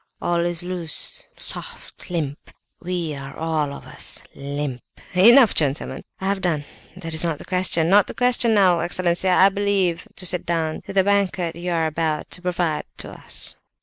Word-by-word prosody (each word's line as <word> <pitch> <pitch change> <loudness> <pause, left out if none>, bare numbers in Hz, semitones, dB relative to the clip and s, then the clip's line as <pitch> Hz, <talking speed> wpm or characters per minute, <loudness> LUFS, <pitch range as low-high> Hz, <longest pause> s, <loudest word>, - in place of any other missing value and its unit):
All 175 0 0
is 175 -1 -1
loose, 175 -3 -3
soft, - - -3
limp—we 170 +1 -5
are 135 0 -8
all 155 -3 -1
of - - -9
us - - -6
limp.... 140 -2 -4 0.3
Enough, 230 +5 +7
gentlemen! 145 -1 0 0.2
I 190 - -5
have 195 0 0
done. 155 -6 -1 0.3
That 165 -3 -3
is 160 - +3
not 165 -3 -1
the - - -11
question. 180 -3 +2
No, 205 +1 +8
the - - -8
question 245 -1 +3
is 220 - +3
now, 185 -4 +4
excellency, 175 +1 +1
I 185 +1 +6
believe, 195 -3 0
to 185 - -4
sit 180 0 +3
down 160 -2 -1
to 200 - -6
the 190 -1 +4
banquet 190 -4 0
you 175 +1 -4
are 165 -1 +1
about 155 -1 -2
to 180 - -6
provide 175 -3 -1
for - - -5
us!" - - -3
175 Hz, 180 wpm, -22 LUFS, 160-190 Hz, 0.3 s, No